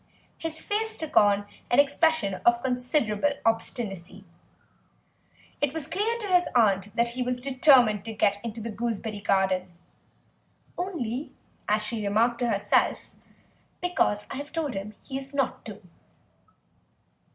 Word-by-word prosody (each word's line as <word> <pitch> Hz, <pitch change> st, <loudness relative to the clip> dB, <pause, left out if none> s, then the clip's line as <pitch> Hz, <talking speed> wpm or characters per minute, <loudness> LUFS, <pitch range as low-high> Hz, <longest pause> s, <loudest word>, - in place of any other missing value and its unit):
His 320 Hz, -1 st, -4 dB
face 440 Hz, +1 st, -1 dB
took 315 Hz, -2 st, -6 dB
on 205 Hz, 0 st, +4 dB, 0.2 s
an 245 Hz, -, +2 dB
expression 285 Hz, -, +3 dB
of 240 Hz, 0 st, +3 dB
considerable 250 Hz, 0 st, 0 dB
obstinacy. 200 Hz, -4 st, -2 dB, 1.4 s
It 290 Hz, +1 st, 0 dB
was 320 Hz, -3 st, -2 dB
clear 430 Hz, +8 st, -1 dB
to 415 Hz, -, -3 dB
his 360 Hz, -2 st, +3 dB
aunt 200 Hz, -4 st, +2 dB
that 235 Hz, 0 st, +2 dB
he 250 Hz, +2 st, -4 dB
was 250 Hz, 0 st, -1 dB
determined 255 Hz, -5 st, +4 dB
to 225 Hz, -, -5 dB
get 205 Hz, -1 st, +1 dB
into 230 Hz, -1 st, -5 dB
the 230 Hz, +1 st, -5 dB
gooseberry 220 Hz, -1 st, -3 dB
garden, 190 Hz, -2 st, +1 dB, 1.0 s
"only," 295 Hz, -, -4 dB, 0.3 s
as 210 Hz, +1 st, +2 dB
she 220 Hz, +1 st, -3 dB
remarked 225 Hz, +4 st, +2 dB
to 245 Hz, -1 st, 0 dB
herself, 205 Hz, -1 st, +1 dB, 0.7 s
"because 355 Hz, -, 0 dB
I -, -, -4 dB
have 290 Hz, +2 st, -7 dB
told 320 Hz, -5 st, -2 dB
him 200 Hz, +2 st, -6 dB
he 270 Hz, -1 st, -5 dB
is 275 Hz, +1 st, -10 dB
not 275 Hz, -2 st, -1 dB
to." 210 Hz, -1 st, -9 dB
235 Hz, 140 wpm, -26 LUFS, 205-285 Hz, 1.4 s, on